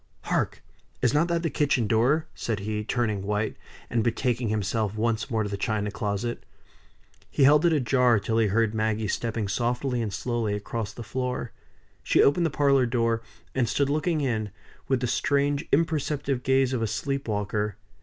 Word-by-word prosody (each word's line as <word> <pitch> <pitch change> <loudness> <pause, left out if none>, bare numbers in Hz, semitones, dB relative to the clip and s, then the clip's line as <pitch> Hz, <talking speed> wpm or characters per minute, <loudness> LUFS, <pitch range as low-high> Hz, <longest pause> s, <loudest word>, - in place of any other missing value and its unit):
Hark! - - -1 0.4
is 125 - +3
not 155 +3 +3
that 170 -1 0
the 165 - +1
kitchen 140 -5 +1
door?" 120 +9 +2
said 110 -3 -3
he, 105 +1 -2
turning 110 -3 -1
white, 105 +2 -1 0.3
and 115 -2 0
betaking 120 0 0
himself 105 0 -1
once 115 +2 0
more 110 -3 0
to 105 - -3
the 100 - -3
china 105 -1 -1
closet. 105 +3 -3 0.9
He 140 - +1
held 150 +4 +6
it - - +3
ajar 125 -5 +3
till 110 +2 0
he 110 - +3
heard 110 +2 +1
Maggie 110 0 0
stepping 110 +1 -2
softly 120 +4 -1
and 110 -3 -2
slowly 115 0 -1
across 105 0 -4
the 120 - -8
floor. 125 +1 -3 0.5
She - - +4
opened 165 +4 +4
the - - -1
parlor 140 -3 +3
door; 115 -1 +1 0.3
and 125 -4 +1
stood 140 -1 +1
looking 155 +1 0
in, 110 -6 -1 0.4
with 130 -2 +1
the - - +1
strange 140 +4 +1
imperceptive 145 -4 0
gaze 130 0 +2
of 125 - -1
a 115 - +1
sleep 140 +5 -2
walker. 105 -1 -1
120 Hz, 175 wpm, -26 LUFS, 110-135 Hz, 0.9 s, held